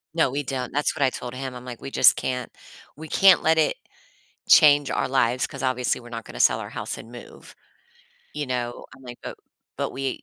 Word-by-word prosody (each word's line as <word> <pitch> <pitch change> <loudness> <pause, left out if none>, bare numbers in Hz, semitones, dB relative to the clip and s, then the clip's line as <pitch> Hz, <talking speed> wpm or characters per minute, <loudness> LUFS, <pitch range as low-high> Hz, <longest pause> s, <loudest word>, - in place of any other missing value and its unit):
No, 160 -5 +3
we 140 +3 -3
don't. 130 -2 -4
That's 145 +2 0
what 150 - -6
I 130 - +4
told 125 -1 -7
him. 130 0 -6
I'm 125 0 -10
like, 120 -2 -9
"We - - -6
just - - +6
can't 125 -1 -4 0.4
we 160 +2 -10
can't 190 +4 +5
let 160 0 +2
it 155 - +2 0.7
change 145 -2 +6
our - - -1
lives 130 -1 +1
'cause, 135 -1 -9
obviously, 125 -1 0
we're 120 - -13
not 115 -1 -7
gonna - - -10
sell - - +4
our - - -7
house - - -5
and 115 - -12
move," 120 - -13 0.8
you 150 -2 -3
know? 120 -1 -4
I'm 135 - -18
like, 120 -1 -10
uh, - - -6 0.4
"But - - -2
we 135 -1 -4
130 Hz, 215 wpm, -24 LUFS, 125-145 Hz, 0.8 s, just